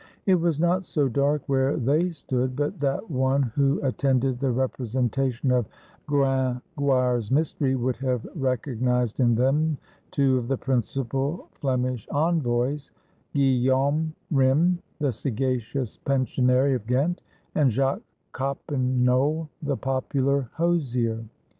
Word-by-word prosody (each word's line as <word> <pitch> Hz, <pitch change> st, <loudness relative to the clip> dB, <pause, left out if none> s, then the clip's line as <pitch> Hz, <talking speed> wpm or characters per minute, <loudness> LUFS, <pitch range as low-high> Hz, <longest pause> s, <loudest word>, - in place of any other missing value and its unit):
It 190 Hz, -, +4 dB
was 165 Hz, -3 st, +1 dB
not 175 Hz, +3 st, +2 dB
so 150 Hz, -5 st, 0 dB
dark 140 Hz, +3 st, +1 dB
where 135 Hz, 0 st, +1 dB
they 150 Hz, +8 st, +2 dB
stood 130 Hz, -5 st, -2 dB
but 145 Hz, +2 st, -2 dB
that 140 Hz, +7 st, -1 dB
one 130 Hz, +1 st, +2 dB
who 140 Hz, +1 st, +2 dB
attended 130 Hz, -1 st, +1 dB
the 135 Hz, 0 st, 0 dB
representation 130 Hz, +1 st, -1 dB
of 125 Hz, -4 st, +2 dB, 0.4 s
Gringoire's 130 Hz, -3 st, +1 dB
mystery 140 Hz, -1 st, +1 dB
would 125 Hz, 0 st, -1 dB
have 130 Hz, -3 st, -1 dB
recognized 125 Hz, -, -1 dB
in 120 Hz, -2 st, +4 dB
them 145 Hz, +5 st, +2 dB, 0.3 s
two 135 Hz, -2 st, +2 dB
of 120 Hz, -, -5 dB
the 135 Hz, +1 st, 0 dB
principal 135 Hz, -, -2 dB
Flemish 125 Hz, -4 st, -2 dB
envoys, 145 Hz, -3 st, 0 dB, 0.5 s
Guillaume 135 Hz, +3 st, +2 dB, 0.2 s
Rym, 150 Hz, +6 st, +3 dB, 0.2 s
the 145 Hz, -4 st, 0 dB
sagacious 125 Hz, +1 st, -2 dB
pensionary 130 Hz, 0 st, +2 dB
of 120 Hz, -4 st, -3 dB
Ghent, 140 Hz, +8 st, +1 dB, 0.3 s
and 145 Hz, -4 st, +3 dB
Jacques 135 Hz, +4 st, 0 dB, 0.3 s
Coppen 130 Hz, -2 st, 0 dB
ole, 150 Hz, +5 st, +1 dB
the 145 Hz, -3 st, -1 dB
popular 135 Hz, 0 st, 0 dB
hosier. 125 Hz, -10 st, 0 dB
135 Hz, 120 wpm, -25 LUFS, 125-145 Hz, 0.5 s, It